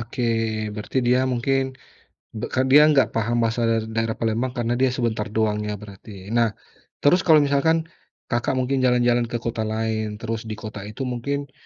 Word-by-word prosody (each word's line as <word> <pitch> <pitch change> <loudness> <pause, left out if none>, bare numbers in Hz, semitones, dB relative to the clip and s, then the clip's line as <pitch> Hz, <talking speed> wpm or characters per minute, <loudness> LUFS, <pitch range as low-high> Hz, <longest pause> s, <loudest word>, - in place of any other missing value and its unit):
Oke 120 +2 -5 0.5
berarti 105 +4 -6
dia 125 +1 +4
mungkin, 135 +3 +1 0.8
be - - -2
k - - -4 0.2
dia 145 +2 +9
enggak 140 -3 +4
paham 115 +2 0
bahasa 115 +1 0 0.3
daerah 115 0 0
Palembang 115 +3 0
karena 120 0 0
dia 130 - +4
sebentar 115 -4 -1
doang 105 -1 +1
ya 105 - -2
berarti. 105 +1 -12 0.3
Nah, 115 - +4 0.5
terus 180 +6 +4
kalau 160 -3 +7
misalkan, 145 +4 +2 0.5
Kakak 120 +2 0
mungkin 130 +1 0
jalan-jalan 120 -1 +3
ke - - -3
kota 115 -1 -2
lain 110 -1 -2
terus 115 -1 -3
di 110 - -4
kota 105 0 -8
itu 110 +5 -6
mungkin 135 +3 -3
120 Hz, 170 wpm, -23 LUFS, 110-130 Hz, 0.8 s, dia